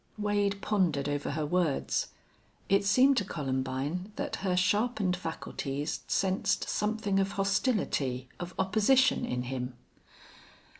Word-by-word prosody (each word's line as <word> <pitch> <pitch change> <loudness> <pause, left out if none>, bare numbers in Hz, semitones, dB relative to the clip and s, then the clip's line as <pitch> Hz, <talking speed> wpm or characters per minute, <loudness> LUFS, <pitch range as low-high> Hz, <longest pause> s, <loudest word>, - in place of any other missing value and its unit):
Wade 205 -1 0
pondered 170 -10 +1
over 145 0 -2
her 155 +1 -1
words. 165 -2 0 0.6
It 195 +1 +4
seemed 255 +6 +5
to - - +3
Columbine 140 +4 -3
that - - -3
her 185 -2 0
sharpened 205 0 +2
faculties 150 -4 -4
sensed 195 +2 +1
something 210 -2 0
of 195 +1 0
hostility, 195 - 0
of 175 0 -6
opposition 225 +7 +3
in 125 0 -2
him. 125 0 -4
185 Hz, 115 wpm, -30 LUFS, 145-205 Hz, 0.6 s, seemed